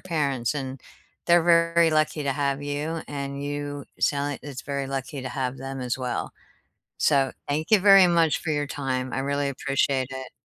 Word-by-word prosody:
parents, 140 -7 -1
and 135 -2 -5 0.5
they're 175 -1 +5
very 170 -1 +4
lucky 155 0 +1
to 140 - +1
have 140 0 -1
you, 150 +3 -3
and 140 -1 -5
you 145 -1 -4 0.2
sound 145 0 +1
like - - -7
it's 140 -3 -7
very 140 -1 -3
lucky 135 +1 -4
to 130 - -4
have 130 0 -3
them 135 +1 -6
as 125 -1 -2
well. 125 -2 -3 0.7
So, 135 -1 +3 0.2
thank 155 +5 -2
you 215 - +7
very 195 -1 +7
much 165 -3 +3
for 160 - -3
your 145 -1 0
time, 130 -3 -3
I - - -2
really 140 +1 -1
appreciate 135 -1 0
it. 130 -1 -7
140 Hz, 185 wpm, -25 LUFS, 135-155 Hz, 0.7 s, you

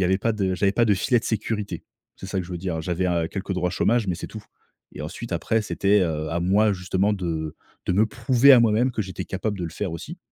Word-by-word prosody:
y 95 - +3
avait 95 +2 +2
pas 115 +2 0
de 95 -3 0
j'avais 100 +1 +2
pas 120 - +3
de 105 -3 +3
filet 120 +6 +2
de - - -6
sécurité. 105 -4 -3 0.3
C'est 95 - -9
ça 95 0 -2
que 90 - -2
je - - -12
veux 90 - -4
dire, 90 -2 -3
heu, - - -3
j'avais, 90 +2 -1
heu, 85 -2 0
quelques 95 -1 -4
droits 90 -1 0
chômage, 110 +4 +1
mais 90 - 0
c'est - - -6
tout. 110 -2 -9 0.5
Et - - -7
ensuite 95 +7 -6
après, 110 +7 +1
c'était, 100 0 +2
heu, 80 -3 -1
à 85 +1 -1
moi 100 +4 +3
justement 95 +2 0
de 80 -5 -3 0.3
de - - +2
me 105 +4 +3
prouver 125 +4 +4
à 125 - +8
moi-même 115 +3 +3
que 110 - -1
j'étais 95 -1 -6
capable 100 +1 -3
de 90 - -3
le 80 - -4
faire 95 -5 -4
aussi. 165 - -7
95 Hz, 270 wpm, -24 LUFS, 90-110 Hz, 0.5 s, à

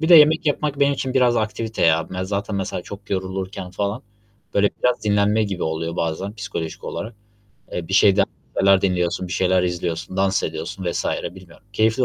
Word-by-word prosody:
Bir 160 - 0
de, 175 - +9
yemek 155 +1 +7
yapmak 145 -1 0
benim 140 0 +5
için 130 -1 -3
biraz 125 -2 +4
aktivite 110 0 -1
ya. 80 0 +2
Ben 90 0 -3
zaten, 100 +2 -2
mesela, 95 -2 -3
çok 100 +2 -10
yorulurken, 95 -1 -3
falan, 100 +5 -2 0.5
böyle 100 0 +4
biraz 125 -4 +2
dinlenme 105 +1 +3
gibi 95 -4 -3
oluyor, 80 +1 -2
bazen 85 +6 -2
psikolojik 85 -7 -5
olarak. 110 +2 -5 0.6
Eee, 85 -2 -4
bir 95 - -1
şeyden 100 0 +6 0.3
şeyler 95 0 +5
dinliyorsun, 90 -1 0
bir - - -5
şeyler 95 -1 +2
izliyorsun, 90 0 -3
dans 95 0 +2
ediyorsun 80 +4 -4
vs. - - -2 0.3
bilmiyorum. 95 +2 -15
Keyifli 110 +4 +2
95 Hz, 180 wpm, -22 LUFS, 90-110 Hz, 0.6 s, de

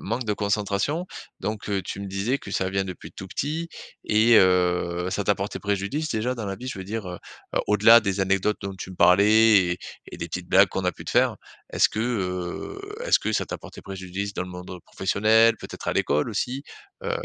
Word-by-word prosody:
manque 120 +4 -3
de 105 - 0
concentration 105 - -1 0.3
donc, 105 +1 -4
heu, 100 -1 0
tu 95 - -6
me 100 - -5
disais 100 +8 -1
que - - -10
ça 95 0 -1
vient 95 0 0
depuis 90 -2 -8
tout 95 - -8
petit 160 - -3 0.4
et 110 +2 +5
heu, 90 -1 +2
ça 100 - -1
t'a 100 +1 +2
porté 100 +2 -4
préjudice 105 +10 -2
déjà 120 +3 -1
dans 110 -4 -5
la 95 0 -4
vie? 125 - -9
Je 125 - -5
veux 95 - -6
dire, 105 0 -4
heu, 90 - -6 0.5
au-delà 110 +3 +7
des 100 -3 -1
anecdotes 95 +2 +1
dont 100 -1 -5
tu 95 - -8
me 90 - -10
parlais 100 +1 +5
et 90 - -5 0.3
et - - -8
des 85 - -4
petites 90 +1 -6
blagues 95 0 +6
qu'on 95 +1 -3
a 90 - +1
pu - - -12
te - - -5
faire. - - +3 0.4
Est-ce - - +4
que, 110 - -5
heu, 95 - -3 0.3
est-ce - - +4
que - - -2
ça - - +1
t'a - - -6
porté - - -12
préjudice 95 +1 -5
dans 90 - -3
le 90 - -10
monde 90 0 -8
professionnel, 110 +4 +3
peut-être - - -8
à - - +1
l'école 75 +9 +1
aussi, 125 +6 -2 0.4
heu 475 - -2
100 Hz, 220 wpm, -25 LUFS, 95-110 Hz, 0.5 s, au-delà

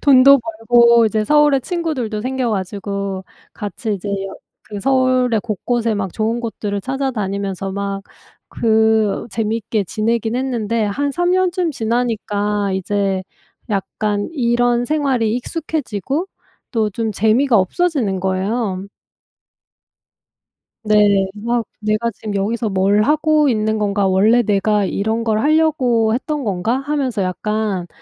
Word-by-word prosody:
돈도 275 0 +7
벌고 235 +1 +4
이제 215 0 0
서울에 295 0 +4
친구들도 280 - -3
생겨 255 0 -1
가지고 200 -1 -3 0.3
같이 210 +1 -4
이제 200 +1 -6
여 195 -1 -3 0.4
그 205 - -3
서울의 255 -1 +2
곳곳에 230 +1 -1
막 195 -3 -3
좋은 225 +2 -1
곳들을 210 -3 -3
찾아다니면서 200 -7 -3
막 200 0 -3 0.5
그 220 -2 +2
재미있게 220 -1 -1
지내긴 225 +3 -1
했는데 230 -4 -1
한 280 +8 -1
3 350 +3 0
년쯤 365 -2 +1
지나니까 210 -4 -1
이제 190 0 -1 0.5
약간 205 0 -2
이런 240 -3 +1
생활이 265 -7 0
익숙해지고 290 - -3 0.5
또 220 -3 +1
좀 220 +2 -2
재미가 225 +5 +3
없어지는 220 - +1
거예요. 190 +1 -1 2.0
네. 205 -2 +4
막 235 +2 -2 0.2
'내가 215 +2 0
지금 205 0 -6
여기서 220 +3 -1
뭘 195 +2 +2
하고 305 +1 +3
있는 220 -1 0
건가? 200 -1 +1
원래 210 +6 +4
내가 210 -1 +1
이런 220 +4 -1
걸 220 -2 +1
하려고 265 -7 +2
했던 290 +4 -2
건가?' 210 +3 0
하면서 275 -6 -2
약간 200 -1 -2
220 Hz, 260 characters per minute, -18 LUFS, 205-255 Hz, 2.0 s, 돈도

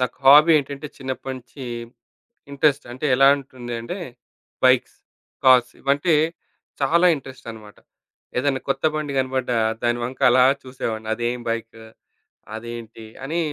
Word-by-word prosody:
నాకు 125 - -2
హాబీ 150 +4 +8
ఏంటంటే, 140 +1 -6
చిన్నప్పటినుంచి 130 0 -7 0.9
ఇంట్రెస్ట్ 140 0 +1
అంటే, 130 +5 -5
ఎలా 135 +1 +6
ఉంటుంది 125 -3 -9
అంటే 180 +11 -6 0.7
బైక్స్, 130 -1 +3 0.5
కార్స్ 125 -1 +6
ఇవంటే 140 +5 +1 0.7
చాలా 170 +6 +4
ఇంట్రెస్టన్నమాట. 115 -6 -11 0.6
ఏదైనా 135 0 0
కొత్త 135 +1 -1
బండి 155 -2 -3
కనపడ్డ 130 -1 -1 0.3
దాని 120 0 +1
వంక 125 +2 -6
అలా 125 +1 +5 0.2
చూసేవాడిని. 115 -4 -5
అదేం 120 +2 -2
బైకు, 115 0 -5 0.7
అదేంటి 115 -1 -8 0.2
అని 160 +5 -2
130 Hz, 115 wpm, -22 LUFS, 120-140 Hz, 0.9 s, హాబీ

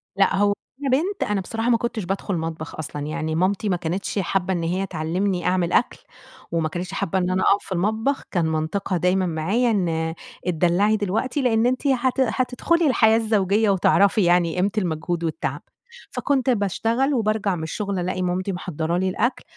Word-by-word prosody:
لأ، 195 0 +3
هو 205 +1 +3 0.3
وأنا 275 - 0
بنت 385 +6 -2
أنا 200 -2 +1
بصراحة 225 +5 -2
ما 235 - +4
كنتش 235 -2 -3
بادخل 195 +1 -2
مطبخ 160 -1 -5
أصلًا، 150 -1 -6
يعني 160 0 -2
مامتي 190 +4 +1
ما 185 - +2
كانتش 175 +4 -3
حابّة 190 0 0
إن 170 -2 -2
هي 185 +4 -1
تعلِّمني 175 +3 -2
أعمل 180 -1 +1
أكل، - - +2 0.5
وما 165 -2 0
كانتش 175 +3 -5
حابة 190 - -1
إن 180 0 0
أنا 185 0 +1
أقَف 200 - +3
في - - -13
المطبخ، 220 +9 0
كان 175 -4 +1
منطقها 160 +4 -1
دايمًا 185 +2 +2
معايا 190 +9 +1
إن 160 -5 0 0.3
اتدلّعي 180 +5 +2
دلوقتي، 220 +8 -1
لأن 230 -3 +2
أنتِ 255 +3 0
هت 260 0 +1
هتدخلي 260 +6 +1
الحياة 225 -4 +4
الزوجية 215 -1 +2
وتعرفي 200 +2 +3
يعني 175 -1 +3
قيمة 190 +2 +1
المجهود 170 -2 -1
والتعب، 160 - -3 0.5
فكنت 270 -2 0
باشتغل 230 +5 +1
وبارجع 215 -5 0
من 160 - -5
الشغل 195 +3 -3
ألاقي 185 +1 -2
مامتي 180 +2 -1
محضّرة 170 -1 -2
لي 185 +1 +1
الأكل 240 +7 -1
190 Hz, 175 wpm, -23 LUFS, 175-220 Hz, 0.5 s, ما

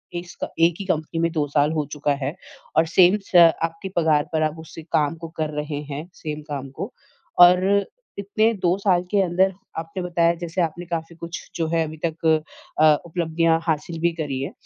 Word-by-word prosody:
S 175 0 -6 0.2
एक 165 0 +4
ही 200 - -5
company 165 -2 -2
में 165 0 +1
2 155 -3 -1
साल 145 +1 +2
हो 155 -2 -1
चुका 150 -1 0
है 140 +5 -2 0.4
और 160 - +5
सेम 185 +3 +6
स - - -9 0.3
आपके 165 +3 -3
पगार 155 -3 +3
पर 155 -1 +2
उस 160 - -12 0.2
काम 150 +1 +2
को - - -3
कर 155 -1 0
रहे 150 -1 -4
हैं, 150 +4 -5
सेम 155 -3 -6
काम 140 -2 -4
को। - - -4 0.5
और 180 +1 +8 0.6
इतने 215 +3 +1
2 180 +1 +3
साल 185 -3 +2
के 205 -1 +3
अंदर 190 +1 +2 0.2
आपने 165 +3 -5
बताया, 170 -1 +2
जैसे 170 +1 -3
आपने 170 +1 -2
काफ़ी 165 0 -5
कुछ 170 0 -8
जो 165 -1 -1
है 165 -1 +3
अभी 155 +1 -9
तक 165 0 -4 0.5
अ, 155 0 +7
उपलब्धियाँ 165 -1 +1
हासिल 160 +1 -1
भी 170 +1 +2
करी 145 -5 -3
है। 135 - -4
165 Hz, 190 wpm, -23 LUFS, 155-175 Hz, 0.6 s, और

